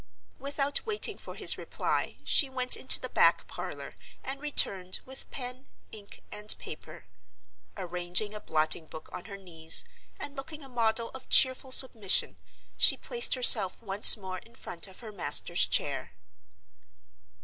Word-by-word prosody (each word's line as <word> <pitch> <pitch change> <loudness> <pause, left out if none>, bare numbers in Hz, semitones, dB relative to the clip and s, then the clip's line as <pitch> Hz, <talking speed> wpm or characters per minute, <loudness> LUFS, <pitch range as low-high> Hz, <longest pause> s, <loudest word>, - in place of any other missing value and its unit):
Without 280 0 -2
waiting 435 -2 +1
for - - -12
his - - +4
reply - - -5
she 280 - +3
went 255 -1 0
into 260 - +3
the - - -6
back - - +1
parlor, - - -10 0.3
and 275 +1 -7
returned 195 -11 +1
with 265 +1 -11
pen, 250 +1 -8 0.2
ink, 205 -2 -11
and 210 0 -1
paper. 155 +2 -12 0.7
Arranging 180 +3 -4
a 210 - -8
blotting 155 -2 -3
book 155 0 -13
on 180 - -9
her 200 -2 -11
knees, 165 -4 +2 0.3
and 290 - -8
looking 290 +2 -9
a - - -12
model 230 -1 -2
of 265 -1 -14
cheerful 260 0 +4
submission, 220 - +3 0.4
she 260 - +4
placed 240 0 +2
herself 240 -7 +5
once 205 0 +5
more 190 -2 -9
in 230 +4 -22
front 170 +3 -4
of 190 +3 -16
her 220 -2 -11
master's 200 -4 +1
chair. - - -3
220 Hz, 150 wpm, -27 LUFS, 185-260 Hz, 0.7 s, herself